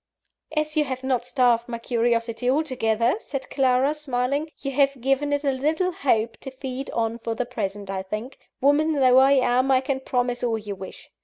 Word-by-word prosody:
"As 305 0 0
you 305 -1 +3
have 260 -1 -5
not 255 -2 -1
starved 245 -3 +2
my 235 - -3
curiosity 230 0 0
altogether," 255 - +1
said 275 -10 -6
Clara, 265 +1 +2
smiling, 285 +1 -2
"but 275 - -2
have 275 0 +2
given 270 +3 0
it 285 0 0
a 280 - +2
little 310 +7 0
hope 230 -8 0
to 270 - -8
feed 265 0 -6
on 230 0 -2
for 230 0 -3
the 250 - -2
present, 205 -5 -4
I 190 -1 -2
think, 215 +7 -6 0.2
woman 295 +4 +3
though 260 -3 +5
I 270 +1 +6
am, 255 0 +2
I 260 -1 +5
can 265 0 -2
promise 245 -2 -1
all 230 -2 +1
you 210 -2 -6
wish. 190 -1 -10
255 Hz, 190 wpm, -24 LUFS, 235-275 Hz, 0.2 s, I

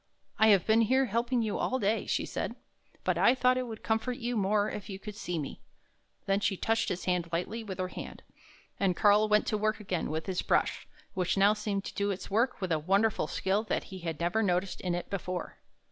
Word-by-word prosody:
" - - -45
I 220 - +6
have 200 -5 +5
been 220 +1 +4
here 260 +4 +3
helping 235 +1 0
you 215 -2 -2
all 260 - 0
day," 215 -1 0
she - - 0
said, - - -4 0.2
" - - -34
but - - +1
I 245 - +5
thought 255 0 +3
it 255 - -3
would 220 -2 -8
comfort 225 +2 0
you 240 0 -2
more 205 0 +2
if 210 - -6
you 195 - -5
could 210 +2 -8
see 180 -4 -3
me." 145 -3 -5 0.6
Then 195 0 +2
she 205 -2 0
touched 225 +3 +1
his 180 - -3
hand 180 -2 0
lightly 190 +7 -2
with 195 -4 -6
her 185 0 -2
hand, - - -8 0.6
and 190 -3 +2
Karl 210 +1 +5
went 210 0 +4
to 215 - -1
work 215 +1 0
again 190 -5 -2
with 160 +1 -3
his 185 -2 -1
brush, - - 0 0.3
which 185 +1 0
now 200 +2 +6
seemed 210 -2 -2
to - - -6
do 200 0 0
its 195 0 -4
work 230 +4 +1
with 185 -2 -2
a 160 - +2
wonder 195 +7 +3
ful - - -2
skill 195 +2 0
that - - -1
he 190 - -6
had 165 -3 -4
never 175 +6 +1
noticed 185 -2 0
in 180 -2 -1
it 175 - -4
before. 185 -2 -4
205 Hz, 240 wpm, -30 LUFS, 185-220 Hz, 0.6 s, I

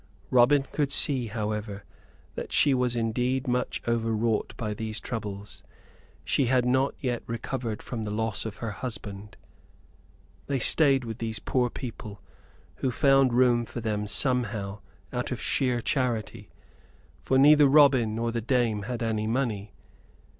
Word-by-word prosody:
Robin 130 +3 +5
could 140 0 -2
see, 130 -5 +1
however, 105 -2 -4 0.5
that - - -6
she 145 - +4
was 125 -1 +1
indeed 125 +4 -1
much 125 0 -1
overwrought 115 -1 0
by 110 -2 -3
these 110 0 -4
troubles. 105 -3 -6 0.6
She 135 - +1
had 125 0 +2
not 130 +2 +2
yet 125 -3 -2
recovered 115 -1 -4
from 120 -3 -5
the 105 - -4
loss 110 +1 -2
of 110 -2 -5
her 110 - -2
husband. 105 -2 -7 1.1
They 140 - 0
stayed 135 +1 +3
with 115 +1 -6
these 110 -1 -3
poor 125 +3 0
people, 110 -5 -8 0.6
who 130 - -1
found 135 0 +4
room 120 -1 +4
for 120 - -7
them 105 -2 -2
somehow, 105 -4 -1 0.3
out - - -2
of - - -3
sheer 125 -2 0
charity, 120 -6 -2 0.7
for 130 - +1
neither 145 +1 +7
Robin 135 -6 +5
nor 115 +1 -1
the 115 0 -2
dame 120 -3 +1
had 120 -1 -3
any 110 -1 -1
money. 110 -5 -1
120 Hz, 145 wpm, -27 LUFS, 110-130 Hz, 1.1 s, neither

